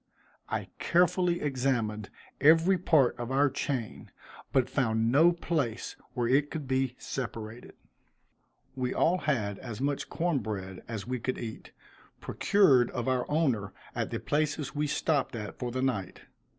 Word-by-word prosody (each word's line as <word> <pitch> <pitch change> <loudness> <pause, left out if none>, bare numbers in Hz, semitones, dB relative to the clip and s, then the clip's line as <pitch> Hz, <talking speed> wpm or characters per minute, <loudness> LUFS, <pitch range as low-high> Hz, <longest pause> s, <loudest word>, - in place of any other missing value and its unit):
I - - -3
carefully 175 0 +2
examined 120 -7 -1 0.3
every 165 +5 +5
part 155 -7 +3
of 120 0 -4
our 140 +1 +3
chain, 130 -5 -3 0.4
but 130 -2 +3
found 115 -4 +1
no 160 +6 +6
place 150 -9 -2 0.2
where 120 -2 0
it 140 +4 +3
could 150 -4 -5
be 130 -1 0
separated. 115 -2 -6 1.0
We 130 -1 -2
all 180 +2 +3
had 110 - -1
as 120 -4 -7
much 140 +1 -1
corn 170 -4 0
bread 95 -4 -5
as 110 -4 -5
we 125 +1 -3
could 130 +3 -2
eat, 115 -2 -7 0.5
procured 140 - +4
of 120 -1 -4
our 130 -1 0
owner 130 - +1 0.2
at - - -2
the - - -3
places 150 -1 -1
we 150 0 0
stopped 145 -3 0
at 105 -3 -6
for 125 - -2
the 130 +2 -2
night. 110 -8 -2
130 Hz, 150 wpm, -29 LUFS, 115-150 Hz, 1.0 s, no